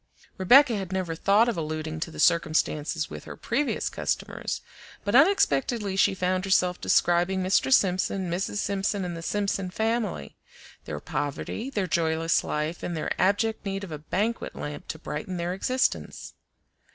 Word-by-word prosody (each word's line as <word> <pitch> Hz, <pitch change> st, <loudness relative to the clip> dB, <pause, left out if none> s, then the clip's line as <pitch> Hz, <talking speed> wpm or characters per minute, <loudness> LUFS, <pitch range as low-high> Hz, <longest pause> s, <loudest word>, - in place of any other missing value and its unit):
Rebecca 245 Hz, +6 st, +6 dB
had 190 Hz, -3 st, -4 dB
never 185 Hz, -3 st, -2 dB
thought 200 Hz, +7 st, +3 dB
of 235 Hz, -, 0 dB
alluding 155 Hz, 0 st, -4 dB
to 165 Hz, -, -3 dB
the -, -, -10 dB
circumstances 160 Hz, -1 st, +1 dB
with -, -, -8 dB
her -, -, -9 dB
previous 275 Hz, +5 st, -1 dB
customers, -, -, -3 dB, 0.4 s
but 205 Hz, -, -1 dB
unexpectedly 235 Hz, -, +3 dB
she 195 Hz, 0 st, +3 dB
found 185 Hz, 0 st, 0 dB
herself 180 Hz, -2 st, +2 dB
describing 175 Hz, +2 st, +2 dB
Mr. 190 Hz, +8 st, +2 dB
Simpson, 190 Hz, -4 st, +2 dB
Mrs. 175 Hz, +4 st, -2 dB
Simpson, 200 Hz, -1 st, -1 dB
and 175 Hz, -1 st, -4 dB
the 165 Hz, -, -6 dB
Simpson 195 Hz, 0 st, -1 dB
family; 220 Hz, -, -2 dB, 0.5 s
their -, -, -5 dB
poverty, 145 Hz, -, -4 dB
their 205 Hz, -8 st, -1 dB
joyless 165 Hz, -1 st, +1 dB
life, 155 Hz, +3 st, -3 dB
and 170 Hz, -, -3 dB
their 155 Hz, -, -3 dB
abject 205 Hz, +4 st, +1 dB
need 195 Hz, 0 st, -3 dB
of 190 Hz, -, -7 dB
a 155 Hz, -, -5 dB
banquet 210 Hz, +9 st, -2 dB
lamp 145 Hz, 0 st, -6 dB
to -, -, -5 dB
brighten 160 Hz, +3 st, -5 dB
their 175 Hz, +1 st, -2 dB
existence. 255 Hz, +7 st, -1 dB
185 Hz, 155 wpm, -26 LUFS, 165-205 Hz, 0.5 s, Rebecca